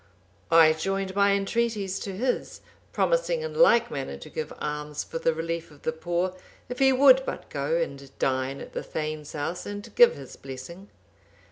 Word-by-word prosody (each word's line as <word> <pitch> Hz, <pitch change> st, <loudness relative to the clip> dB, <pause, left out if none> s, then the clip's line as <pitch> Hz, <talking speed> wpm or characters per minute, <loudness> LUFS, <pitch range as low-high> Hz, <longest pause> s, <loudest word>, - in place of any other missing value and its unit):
I 165 Hz, -1 st, +7 dB
joined 195 Hz, +4 st, -2 dB
my 200 Hz, 0 st, +4 dB
entreaties 200 Hz, -1 st, -1 dB
to 195 Hz, -2 st, -5 dB
his, 250 Hz, +3 st, -2 dB, 0.3 s
promising -, -, +1 dB
in 475 Hz, -, -4 dB
like 240 Hz, -, +5 dB
manner 135 Hz, -, -4 dB
to -, -, -12 dB
give 155 Hz, -1 st, -4 dB
alms 150 Hz, 0 st, -4 dB
for 165 Hz, -, -5 dB
the 165 Hz, -, +2 dB
relief 165 Hz, +1 st, -4 dB
of 150 Hz, -2 st, -18 dB
the -, -, 0 dB
poor,(785) 175 Hz, +3 st, -2 dB, 0.3 s
if 250 Hz, -, -5 dB
he 270 Hz, 0 st, +5 dB
would 265 Hz, 0 st, +7 dB
but -, -, -6 dB
go 145 Hz, +3 st, -1 dB
and 140 Hz, -4 st, -4 dB
dine 130 Hz, +1 st, -1 dB
at -, -, -10 dB
the -, -, -3 dB
thegn's 155 Hz, -1 st, -5 dB
house, 160 Hz, +4 st, -4 dB
and 205 Hz, 0 st, -7 dB
give 485 Hz, 0 st, +6 dB
his -, -, -11 dB
blessing. 135 Hz, +9 st, -9 dB
175 Hz, 175 wpm, -26 LUFS, 150-220 Hz, 0.3 s, I